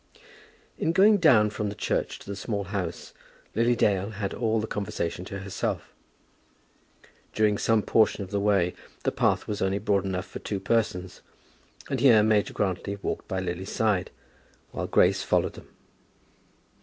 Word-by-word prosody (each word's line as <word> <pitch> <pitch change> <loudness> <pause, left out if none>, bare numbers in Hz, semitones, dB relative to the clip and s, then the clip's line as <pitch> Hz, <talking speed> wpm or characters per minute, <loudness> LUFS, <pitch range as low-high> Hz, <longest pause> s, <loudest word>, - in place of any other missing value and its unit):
In 165 - +1
going 205 +4 +6
down 120 - +5
from 105 0 -3
the 100 - -6
church - - -2
to - - -15
the 100 - -5
Small 100 0 -3
House 95 -3 -5 0.4
Lily 120 +2 +2
Dale 100 -3 +1
had 100 -2 -4
all 115 -2 0
the 110 - -2
conversation 90 -4 -3
to 100 +1 -6
herself. 100 0 -4 1.4
During 105 -1 +2
some 115 -2 +2
portion 110 -2 +2
of 95 - -10
the 100 - 0
way 100 -3 +2 0.3
the - - +1
path - - +1
was 105 0 -3
only 95 +1 +1
broad 100 -2 +1
enough 95 -1 -3
for - - -8
two 100 - -4
persons, 95 -3 -1 0.7
and - - -2
here 115 -6 +6
Major 105 -1 +2
Grantly 100 0 -1
walked - - -3
by 95 - -2
Lily's 95 +2 -4
side, 105 -5 0 0.6
while - - -4
Grace - - +3
followed - - +1
them. - - -13
100 Hz, 160 wpm, -26 LUFS, 95-110 Hz, 1.4 s, going